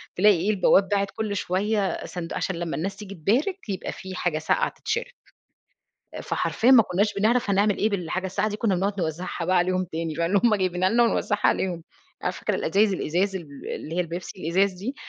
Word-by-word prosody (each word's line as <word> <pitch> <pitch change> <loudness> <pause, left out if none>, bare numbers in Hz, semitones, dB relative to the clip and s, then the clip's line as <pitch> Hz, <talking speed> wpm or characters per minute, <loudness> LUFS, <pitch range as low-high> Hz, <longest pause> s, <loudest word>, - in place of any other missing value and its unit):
تلاقي 205 +1 +5
إيه 185 +6 -1
البواب 195 -1 +4
باعِت 200 -1 0
كل 215 -2 -3
شويّة 200 +2 -1
صندوق، 175 -2 -5
عشان 190 - -2
لمّا 170 -1 -3
الناس 195 +5 -3
تيجي 200 -2 -9
تبارك، 245 - 0
يبقى 190 - -3
في 190 -1 -8
حاجة 175 -4 -1
ساقعة 155 - +1
تتشرب. 445 +2 -3 1.2
فحرفيًا 245 +3 +1
ما 235 -4 +8
كُنّاش 205 +4 0
بنعرف 225 +3 +1
هنعمل 200 +1 +2
إيه 215 - +2
بالحاجة 185 -1 -2
الساقعة 190 +3 -1
دي 210 - -4
كنّا 210 -4 +1
بنقعد 195 +3 0
نوزّعها 170 +1 -3
بقى 185 +1 +3
عليهم 185 +1 +1
تاني 160 -1 -3
فاللي 170 +4 +2
هُم 225 -3 +5
جايبينها 185 -1 +1
لنا 240 +3 +4
ونوزّعها 210 -2 +1
عليهم. 175 -3 0 0.4
أ - - +1
فاكرة - - -2
الأزايز 200 0 +2
الإزاز 190 +3 0
ال 145 -7 -8
اللي 160 - -7
هي - - 0
البيبسي 175 +3 -6
الإزاز 190 +5 +2
دي، 205 +10 -5
190 Hz, 190 wpm, -25 LUFS, 175-210 Hz, 1.2 s, ما